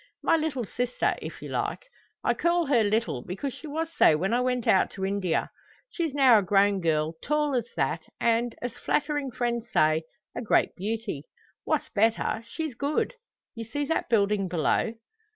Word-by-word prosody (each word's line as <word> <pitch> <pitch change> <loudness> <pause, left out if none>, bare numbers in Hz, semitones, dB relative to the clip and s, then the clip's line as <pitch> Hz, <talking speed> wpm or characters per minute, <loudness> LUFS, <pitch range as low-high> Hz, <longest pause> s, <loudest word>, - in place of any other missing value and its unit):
"My - - +4
little 305 -7 -1
sister, 245 +4 0
if - - -8
you - - -6
like. - - -2 0.4
I - - +3
call 340 0 +1
her 260 -6 +3
little 215 - 0
because 235 +9 -4
she 315 - -10
was 320 +2 -3
so 155 - +5
when 190 +7 0
I 245 - +3
went 250 -1 0
out 190 - +4
to 190 -1 -3
India. 195 -4 -1 0.4
She's 325 -5 -2
now 260 -6 +7
a - - 0
grown 200 +1 +3
girl, 155 -1 +1
tall 300 -1 0
as 240 -3 0
that, - - -1
and, 235 0 +1
as 245 - -3
flattering 290 -2 -1
friends 240 -2 -2
say, 160 -3 +3 0.3
a - - -3
great 225 - +2
beauty. 205 -6 -4 0.4
What's - - 0
better, 225 +1 +1
she's 315 -4 -4
good. 285 - -1 0.4
You 230 - -6
see 285 +6 -3
that 325 - -1
building 205 -3 +2
below?" 180 +6 +1
230 Hz, 175 wpm, -27 LUFS, 200-280 Hz, 0.4 s, now